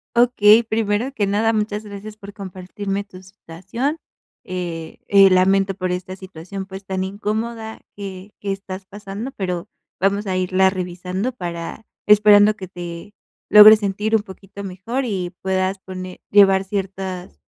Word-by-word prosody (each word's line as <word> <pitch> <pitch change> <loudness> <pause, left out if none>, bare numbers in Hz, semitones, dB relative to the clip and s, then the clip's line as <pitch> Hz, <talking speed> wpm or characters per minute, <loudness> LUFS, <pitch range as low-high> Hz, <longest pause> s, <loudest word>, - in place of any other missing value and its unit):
Okey, 235 -2 +6
primero 220 +2 -1
que 205 -6 0
nada 220 +3 +1
muchas 210 0 -1
gracias 210 +1 -9
por 200 -1 -11
compartirme 195 +1 -5
tu 185 -2 -14
situación. 195 - -5 0.5
Eh 175 -3 -5
eh, 195 -1 +7
lamento 195 +1 +3
por 185 -1 -2
esta 185 +1 -4
situación, 190 +1 -8
pues, 195 0 -9
tan 190 -1 -3
incómoda 220 +3 -4 0.2
que 195 0 -8
que 200 - -3
estás 195 -1 -6
pasando, 205 +4 -7
pero 180 -1 -3 0.3
vamos 200 +2 +1
a 190 -2 -2
irla 185 +1 +2
revisando 185 +5 -3
para 175 0 -6 0.2
esperando 210 0 +6
que 190 -3 -8
te 175 +2 -8 0.4
logres 210 +1 +10
sentir 210 +3 0
un 210 - +1
poquito 200 0 -11
mejor 200 +8 -3
y 190 -6 -2
puedas 190 0 0
pone 185 -1 -9
llevar 195 -1 +6
ciertas 190 -2 -5
195 Hz, 145 wpm, -21 LUFS, 185-210 Hz, 0.5 s, logres